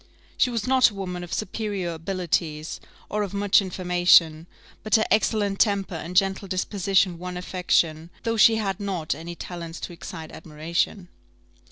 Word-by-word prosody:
She 255 - +3
was 230 -4 -2
not 260 -1 +5
a 210 - -13
woman 180 -2 -5
of 175 - -9
superior 205 -3 -3
abilities, 165 -2 -2 0.3
or 210 - -2
of 200 -1 -3
much 205 0 +4
information; 175 -3 +3 0.3
but 215 - +2
her 220 - +3
excellent 210 -2 +1
temper 200 -3 +1
and 170 +2 -6
gentle 195 0 +2
disposition 185 -1 +1
won 180 0 -5
affection, 170 -3 0
though 230 -1 0
she 225 +1 +6
had 195 -4 -2
not 190 -6 -2
any 165 +4 -8
talents 170 -1 -7
to 175 - -6
excite 160 -1 -8
admiration. 170 +4 -3
185 Hz, 155 wpm, -25 LUFS, 170-205 Hz, 0.3 s, she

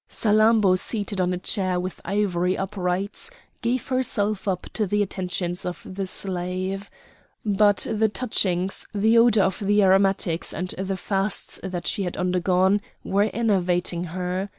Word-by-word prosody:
Salammbô 215 -3 +4
seated 205 -2 -1
on 180 0 +1
a 180 - -1
chair 185 -1 0
with 185 +1 -5
ivory 185 -2 0
uprights, 195 - -2 0.3
gave 245 +2 -1
herself 215 -6 0
up 185 -2 -1
to 215 -3 0
the 205 +2 +2
attentions 180 -2 -3
of 180 -1 -4
the 190 0 -4
slave. 185 +1 -3 0.6
But 205 -1 +3
the 220 0 +1
touchings, 195 -5 0
the 220 +3 +4
odour 230 -4 +5
of 190 - 0
the 205 0 +3
aromatics, 190 -3 +2
and 180 +3 -3
the 190 +1 -3
fasts 195 +1 -1
that 180 -2 -5
she - - 0
had 180 -2 -3
undergone, 185 +2 +2 0.2
were 200 +2 +1
enervating 180 -5 0
her. 180 +3 -3
195 Hz, 145 wpm, -24 LUFS, 180-210 Hz, 0.6 s, odour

